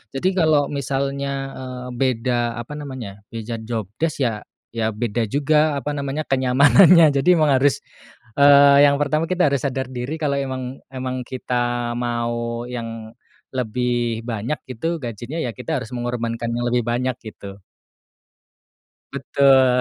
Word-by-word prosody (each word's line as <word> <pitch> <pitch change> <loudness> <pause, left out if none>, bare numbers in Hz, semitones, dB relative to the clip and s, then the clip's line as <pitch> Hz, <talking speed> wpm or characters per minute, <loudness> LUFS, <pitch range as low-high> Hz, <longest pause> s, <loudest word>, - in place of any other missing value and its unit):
Jadi 135 +7 0
kalau 155 -4 +3
misalnya, 140 0 -2 0.3
eee, 125 -1 -7
beda 120 -2 0
apa 120 - -11
namanya, 130 -9 -7
beda 115 0 -5
job 110 0 -3 0.2
desc 160 -3 -1
ya 110 -4 -2 0.3
ya 110 -1 -1
beda 115 +1 -1
juga 150 +4 +2
apa 140 +1 -3
namanya, 140 +2 -2
kenyamanannya 140 +6 +6
jadi 160 - +1
emang 155 -3 +3
harus, 140 +1 +2 0.6
eee, 140 0 +7
yang 140 - +3
pertama 155 +3 0
kita 180 -4 +2
harus 140 - +1
sadar 130 -1 -3
diri 125 +4 -4
kalau 140 -2 0
emang 130 -1 -5
emang 130 -1 -5
kita 120 -2 -2
mau 120 -1 -2
yang 115 -2 -6 0.4
lebih 120 -2 -1
banyak 115 +6 -3
gitu 160 +7 -3
gajinya, 120 +6 -5
ya 125 - -2
kita 135 +2 -3
harus 115 - -8
mengorbankan 120 -1 -3
yang 120 0 -1
lebih 120 -1 0
banyak 125 +1 -1
gitu. 100 -3 -10 1.6
Betul. 130 -2 +4
125 Hz, 140 wpm, -21 LUFS, 120-140 Hz, 1.6 s, eee